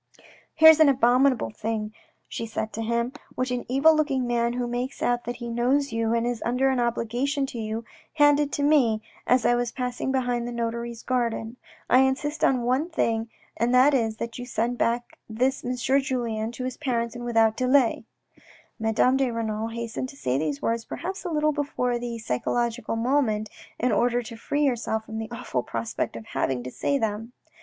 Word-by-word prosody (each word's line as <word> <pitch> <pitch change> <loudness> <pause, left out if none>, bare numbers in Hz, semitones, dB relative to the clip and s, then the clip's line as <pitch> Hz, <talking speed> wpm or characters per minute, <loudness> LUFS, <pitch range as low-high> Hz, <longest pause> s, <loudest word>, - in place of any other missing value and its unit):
" - - -25
Here's 320 0 +8
an 310 -2 +7
abominable 255 - +3
thing," 215 - -3 0.3
she 230 - -5
said 220 0 -4
to 225 - -4
him, 235 +2 -1
" - - -26
which 255 0 -1
an 245 -1 -3
evil 285 +5 +5
looking 275 -4 +1
man 235 0 0
who 245 0 -2
makes 245 +2 -3
out 240 0 +1
that 240 - -3
he 240 0 -7
knows 250 +4 +1
you 225 0 0
and 230 0 +1
is 240 -2 -2
under 255 +3 +2
an 260 - 0
obligation 240 +4 0
to 245 -3 -7
you, 220 +1 -4 0.3
handed 290 -1 +4
to 285 - -1
me 250 -8 +3 0.2
as 250 -1 +3
I - - +5
was 240 0 0
passing 250 0 -3
behind 245 -2 0
the - - -4
notary's 235 0 -4
garden. 235 -2 -1 0.3
I 255 - +5
insist 270 +3 0
on 255 -3 +3
one 260 +7 +1
thing 230 -8 0 0.3
and 240 +2 +1
that 265 +4 +6
is 225 -4 +1
that 230 +2 -5
you 245 - -5
send 240 0 -1
back 240 +1 -1
this 255 +5 0
M. 250 +1 -2
Julien 245 -4 0
to 255 - -6
his 255 0 -4
parents 235 -4 -2
and 240 - -6
without 225 -2 +3
delay." 255 -1 +2 0.8
Madame 220 +4 +2
de 270 -2 +1
Renal 225 -1 -2
hastened 235 +2 -4
to - - -12
say 130 - 0
these 150 -2 -2
words, 230 0 0
perhaps 380 - -6
a - - -1
little 305 -1 +2
before 250 -5 -1
the 235 -1 -4
psychological 230 - -1
moment, 225 -3 0 0.3
in 250 +1 +1
order 240 +3 +2
to 230 0 -9
free 290 +6 -1
herself 225 -4 -1
from 220 0 -6
the 220 0 -5
awful 235 - -3
prospect 115 -1 -3
of 115 -1 -8
having 130 -2 -2
to 125 - -6
say 280 - 0
them. 225 0 -3
240 Hz, 195 wpm, -25 LUFS, 225-260 Hz, 0.8 s, Here's